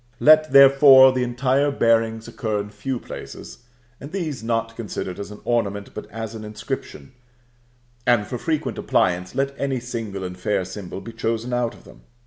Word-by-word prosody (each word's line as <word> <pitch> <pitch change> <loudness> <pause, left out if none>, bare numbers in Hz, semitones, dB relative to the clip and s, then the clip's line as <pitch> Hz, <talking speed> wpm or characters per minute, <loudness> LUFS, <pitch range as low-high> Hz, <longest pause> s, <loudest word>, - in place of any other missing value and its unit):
Let, 155 0 +6
therefore, 135 -1 +8
the 130 -1 -1
entire 130 +3 +1
bearings 115 -4 +1
occur 110 -3 -3
in 105 0 -6
few 120 +5 -4
places, - - -10 0.4
and 140 - -9
these 160 - -4
not 115 0 -2
considered 100 -5 -5
as 100 - -6
an 105 - -11
ornament, 100 -4 -1
but - - -8
as 115 0 -6
an 110 -1 -8
inscription; 110 +5 -7 1.0
and 120 -4 +3
for 125 - -5
frequent 155 -2 -2
appliance, 90 +3 0
let 135 +1 0
any 135 -2 -1
single 115 -5 -5
and 90 0 -5
fair 95 0 -1
symbol 95 0 -7
be 115 - -9
chosen 115 +2 -2
out 120 -1 -1
of - - -18
them. - - -16
115 Hz, 170 wpm, -22 LUFS, 105-135 Hz, 1.0 s, therefore